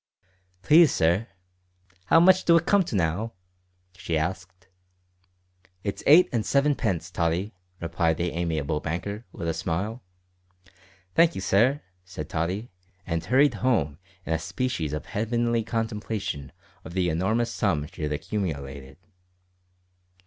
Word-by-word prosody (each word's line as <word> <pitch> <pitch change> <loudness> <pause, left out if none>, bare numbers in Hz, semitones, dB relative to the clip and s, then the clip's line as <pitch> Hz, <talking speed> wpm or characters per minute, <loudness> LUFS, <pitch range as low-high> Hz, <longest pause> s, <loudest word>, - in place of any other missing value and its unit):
"Please, 155 - +6
sir, 85 +8 +1 0.8
'ow 165 - +7
much 185 +2 +6
do 170 -1 +6
it 170 - 0
come 200 -1 +4
to 125 - -4
now?" 95 +6 -1 0.6
she 85 -2 -2
asked. 90 +3 -4 1.2
"It's 100 - -3
eight 165 +5 +8
and 115 -3 +1
sevenpence, 110 - 0
Tottie," 85 +4 -1 0.3
replied 85 -1 0
the 85 0 -1
amiable 80 -3 -1
banker, 100 +8 -4
with 85 - -6
a 80 - 0
smile. 100 +10 -3 1.1
"Thank 170 0 +4
you, - - -4
sir," 120 +10 +2 0.2
said 90 -5 -8
Tottie, 90 +8 -2 0.3
and 85 -2 -2
hurried 130 +10 +4
home 80 - +1 0.3
in 80 - -1
a 80 - 0
species 85 - -2
of 75 0 -4
heavenly 115 +1 0
contemplation 110 - -3 0.3
of 80 - -9
the 90 -2 +1
enormous 110 +9 0
sum 80 -8 0
she 75 - -11
had 75 0 -2
accumulated. 70 -6 -4
95 Hz, 130 wpm, -26 LUFS, 80-115 Hz, 1.2 s, eight